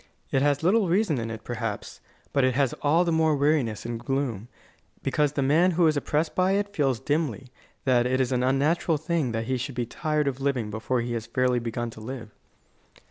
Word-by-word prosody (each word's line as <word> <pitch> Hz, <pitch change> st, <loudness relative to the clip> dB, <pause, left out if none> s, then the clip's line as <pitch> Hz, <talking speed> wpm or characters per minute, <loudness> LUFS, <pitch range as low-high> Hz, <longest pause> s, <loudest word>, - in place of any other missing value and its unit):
It 135 Hz, -, +2 dB
has 145 Hz, +1 st, +2 dB
little 195 Hz, +2 st, +3 dB
reason 175 Hz, -, +2 dB
in 115 Hz, 0 st, -3 dB
it, 110 Hz, -1 st, -7 dB
perhaps, 115 Hz, -3 st, -5 dB, 0.3 s
but 140 Hz, -, +3 dB
it 130 Hz, -1 st, +2 dB
has 135 Hz, -3 st, +2 dB
all 160 Hz, +5 st, +3 dB
the 170 Hz, -, +1 dB
more 160 Hz, -1 st, +3 dB
weariness 140 Hz, -7 st, +1 dB
and 120 Hz, -1 st, -4 dB
gloom, 125 Hz, -5 st, -2 dB, 0.6 s
because 150 Hz, -1 st, +1 dB
the 140 Hz, -, 0 dB
man 160 Hz, +7 st, +4 dB
who 175 Hz, -, +5 dB
is 155 Hz, -1 st, +3 dB
oppressed 150 Hz, +3 st, 0 dB
by 185 Hz, +1 st, +2 dB
it 200 Hz, 0 st, -1 dB
feels 135 Hz, -, +1 dB
dimly 135 Hz, -2 st, -2 dB, 0.4 s
that 125 Hz, -2 st, +3 dB
it 130 Hz, +1 st, +1 dB
is 130 Hz, -1 st, +1 dB
an 125 Hz, -1 st, +1 dB
unnatural 145 Hz, +5 st, +2 dB
thing 160 Hz, -4 st, -1 dB
that 115 Hz, 0 st, -2 dB
he 130 Hz, +2 st, 0 dB
should 130 Hz, +1 st, -5 dB
be 120 Hz, -1 st, -1 dB
tired 150 Hz, +4 st, -1 dB
of 135 Hz, -1 st, -2 dB
living 130 Hz, -6 st, -1 dB
before 110 Hz, +3 st, -1 dB
he 120 Hz, 0 st, -3 dB
has 115 Hz, -1 st, -4 dB
fairly 125 Hz, +1 st, +1 dB
begun 120 Hz, 0 st, -3 dB
to 110 Hz, -, -12 dB
live. 115 Hz, -1 st, -7 dB
135 Hz, 210 wpm, -26 LUFS, 120-155 Hz, 0.6 s, who